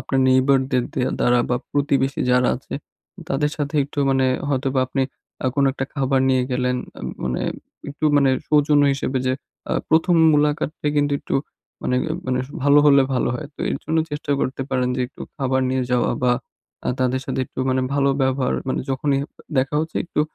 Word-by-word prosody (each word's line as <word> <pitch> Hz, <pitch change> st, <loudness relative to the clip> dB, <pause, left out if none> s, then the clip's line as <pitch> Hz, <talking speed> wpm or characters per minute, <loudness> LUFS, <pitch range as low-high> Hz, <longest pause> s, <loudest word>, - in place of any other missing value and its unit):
আপনার 135 Hz, -, 0 dB
নেইবারদের 130 Hz, -1 st, +3 dB
দে -, -, 0 dB, 0.2 s
দ্বারা 120 Hz, 0 st, +4 dB
বা 125 Hz, -, +3 dB, 0.2 s
প্রতিবেশী 140 Hz, -1 st, +1 dB
যারা 125 Hz, 0 st, +4 dB
আছে 130 Hz, -, -8 dB, 0.5 s
তাদের 150 Hz, +2 st, 0 dB
সাথে 145 Hz, 0 st, -3 dB
একটু 145 Hz, -, -10 dB
মানে 135 Hz, -1 st, +2 dB, 0.2 s
হয়তোবা 135 Hz, -1 st, 0 dB
আপনি 135 Hz, +1 st, -1 dB, 0.4 s
আ -, -, +2 dB
কোনো 140 Hz, -1 st, +3 dB
একটা 135 Hz, -, -3 dB
খাবার 135 Hz, -1 st, +1 dB
নিয়ে 130 Hz, -1 st, +3 dB
গেলেন। 125 Hz, 0 st, 0 dB, 0.2 s
এ -, -, -10 dB, 0.2 s
মানে 65 Hz, -1 st, -1 dB, 0.5 s
একটু 145 Hz, +2 st, -5 dB
মানে 140 Hz, -2 st, +4 dB, 0.2 s
সৌজন্য 150 Hz, -1 st, +4 dB
হিসেবে 135 Hz, -1 st, -2 dB
যে 130 Hz, -, +2 dB, 0.4 s
আ -, -, 0 dB, 0.2 s
১ম 165 Hz, +3 st, +4 dB, 0.2 s
মুলাকাতটা 150 Hz, +1 st, 0 dB
কিন্তু 145 Hz, 0 st, +2 dB
একটু -, -, -4 dB, 0.5 s
মানে, 125 Hz, -, 0 dB, 0.3 s
মানে, 125 Hz, 0 st, 0 dB, 0.2 s
ভালো 145 Hz, +1 st, +6 dB
হলে 140 Hz, -2 st, +6 dB
ভালো 125 Hz, -, +1 dB
হয়। 155 Hz, +3 st, -5 dB
তো -, -, -13 dB
এর -, -, 0 dB
জন্য 160 Hz, +1 st, 0 dB
চেষ্টা 145 Hz, 0 st, -5 dB
করতে 135 Hz, +1 st, -2 dB
পারেন 125 Hz, -1 st, +1 dB
যে -, -, -1 dB
একটু 130 Hz, -, -21 dB, 0.2 s
খাবার 130 Hz, -1 st, 0 dB
নিয়ে 130 Hz, 0 st, 0 dB
যাওয়া 125 Hz, -1 st, +2 dB
বা 125 Hz, -1 st, +4 dB, 0.5 s
আ -, -, 0 dB
তাদের 130 Hz, 0 st, +1 dB
সাথে 130 Hz, -, -2 dB
একটু -, -, -13 dB
মানে 130 Hz, 0 st, +2 dB
ভালো 140 Hz, -1 st, +3 dB
ব্যবহার 130 Hz, 0 st, +1 dB
মানে -, -, 0 dB
যখনই 135 Hz, +1 st, +1 dB, 0.4 s
দেখা 135 Hz, +3 st, 0 dB
হচ্ছে 160 Hz, +1 st, -4 dB
একটু 170 Hz, -, -2 dB
135 Hz, 185 wpm, -22 LUFS, 130-145 Hz, 0.5 s, ভালো